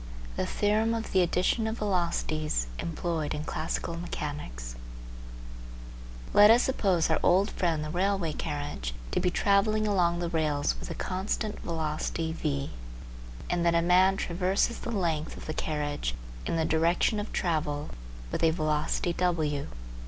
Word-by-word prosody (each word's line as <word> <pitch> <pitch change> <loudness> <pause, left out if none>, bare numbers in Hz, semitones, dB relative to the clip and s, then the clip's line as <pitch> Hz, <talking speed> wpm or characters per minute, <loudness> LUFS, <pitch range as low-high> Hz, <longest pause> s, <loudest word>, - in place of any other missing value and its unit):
THE - - -1
THEOREM 215 +2 +1
OF 225 -1 -4
THE 190 - +4
ADDITION 180 +6 +1
OF 220 +1 -2
VELOCITIES 170 - 0
EMPLOYED 165 -2 -2
IN 150 - -4
CLASSICAL 165 +2 -3
MECHANICS 145 - -5 1.6
Let 205 +1 +8
us 235 +2 +7
suppose 185 -10 +2
our 160 - +3
old 190 +4 +4
friend 165 -4 0
the 155 - -4
railway 185 -2 0
carriage 70 - -4 0.2
to - - +1
be 180 - +2
travelling 215 +3 +2
along 180 -4 +2
the 175 0 -1
rails 155 -3 +1
with - - -7
a - - -4
constant 205 +3 -2
velocity 160 0 -2
v, 140 -4 -2 0.8
and 175 -1 0
that 170 0 +3
a 170 - +4
man 185 +2 +5
traverses 185 +7 0
the - - -5
length 165 -8 -1
of - - -9
the 155 - -3
carriage 145 - -2 0.3
in - - 0
the 160 -1 +1
direction 170 +7 +2
of 205 - -5
travel 150 -4 -1 0.4
with - - -2
a 165 - +6
velocity 155 +1 0
w. 155 -6 0
170 Hz, 150 wpm, -29 LUFS, 155-190 Hz, 1.6 s, Let